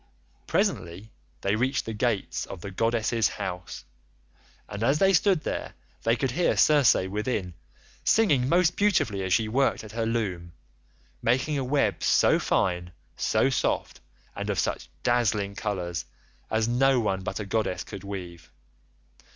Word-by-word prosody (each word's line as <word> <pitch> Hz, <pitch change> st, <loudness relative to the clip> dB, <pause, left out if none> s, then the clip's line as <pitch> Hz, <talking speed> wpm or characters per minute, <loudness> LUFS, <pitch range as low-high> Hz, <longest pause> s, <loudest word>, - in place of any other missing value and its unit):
Presently 105 Hz, -, -1 dB, 0.3 s
they 100 Hz, +1 st, +1 dB
reached 130 Hz, +4 st, 0 dB
the 115 Hz, -, -4 dB
gates 110 Hz, -2 st, -1 dB
of 95 Hz, -, -8 dB
the 100 Hz, -, -6 dB
goddess's 115 Hz, +1 st, +1 dB
house, 90 Hz, 0 st, -6 dB, 0.8 s
and 105 Hz, -, -7 dB
as 135 Hz, +6 st, +3 dB
they 195 Hz, +3 st, +4 dB
stood 185 Hz, -1 st, +3 dB
there -, -, -4 dB, 0.3 s
they 115 Hz, +1 st, +2 dB
could 130 Hz, +1 st, -1 dB
hear 175 Hz, +6 st, +1 dB
Circe 145 Hz, -4 st, +5 dB
within, 95 Hz, -1 st, -2 dB, 0.5 s
singing 145 Hz, -, +3 dB
most 175 Hz, +1 st, +3 dB
beautifully 145 Hz, -, +1 dB
as 95 Hz, -1 st, -3 dB
she 110 Hz, +4 st, +3 dB
worked 135 Hz, +3 st, +1 dB
at 110 Hz, -, -10 dB
her 115 Hz, 0 st, -2 dB
loom, 95 Hz, -7 st, -2 dB, 0.7 s
making 130 Hz, +6 st, +1 dB
a -, -, -1 dB
web 140 Hz, +2 st, +1 dB
so -, -, +4 dB
fine, 90 Hz, -1 st, 0 dB, 0.2 s
so 110 Hz, +5 st, +1 dB
soft, 130 Hz, -, -1 dB, 0.4 s
and -, -, -4 dB
of -, -, -1 dB
such -, -, -2 dB
dazzling 110 Hz, -5 st, +1 dB
colours 90 Hz, -7 st, -3 dB, 0.4 s
as 110 Hz, 0 st, +1 dB
no 130 Hz, +2 st, +3 dB
one 95 Hz, -4 st, -1 dB
but 95 Hz, -, -4 dB
a 105 Hz, -, -4 dB
goddess 105 Hz, -2 st, -1 dB
could 95 Hz, -, -9 dB
weave. 90 Hz, -4 st, -8 dB
110 Hz, 150 wpm, -26 LUFS, 100-130 Hz, 0.8 s, Circe